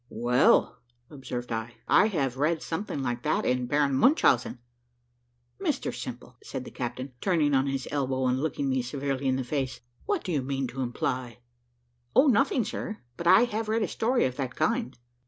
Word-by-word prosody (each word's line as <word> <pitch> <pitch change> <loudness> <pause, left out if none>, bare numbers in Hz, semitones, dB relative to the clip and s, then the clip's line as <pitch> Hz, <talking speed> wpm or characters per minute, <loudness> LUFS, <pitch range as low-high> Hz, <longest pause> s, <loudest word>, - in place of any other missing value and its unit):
"Well," 120 +3 +3 0.3
observed 125 -4 -6
I, 115 +1 -4
"I 210 - +5
have 140 - -1
read 155 +3 +1
something 165 -5 -3
like 120 -1 -2
that 155 +4 0
in 125 -1 +1
Baron 145 0 +2
Munchausen." 135 - +3 1.0
"Mr - - -1
Simple," - - -8
said - - -6
the - - -9
captain, 130 +2 -5
turning 160 -7 +2
on 135 0 +3
his 135 -1 -2
elbow 130 -2 0
and 130 +1 +1
looking 145 -2 -1
me 130 -1 +1
severely 135 +1 -3
in 130 - +2
the 130 - -1
face, 130 -1 -3 0.3
"what 405 -5 0
do 185 - -3
you 150 -5 +1
mean 135 +1 -2
to 135 +2 -5
imply?" 125 0 -2 0.8
"O 265 - +7
nothing, 250 -1 +3
sir, 215 -1 -5 0.2
but 170 - -4
I 185 +6 +7
have 220 -2 -2
read 220 0 +1
a - - 0
story 245 +3 +1
of 130 -1 -3
that 130 -3 -3
kind." 230 - 0
135 Hz, 180 wpm, -27 LUFS, 125-170 Hz, 1.0 s, O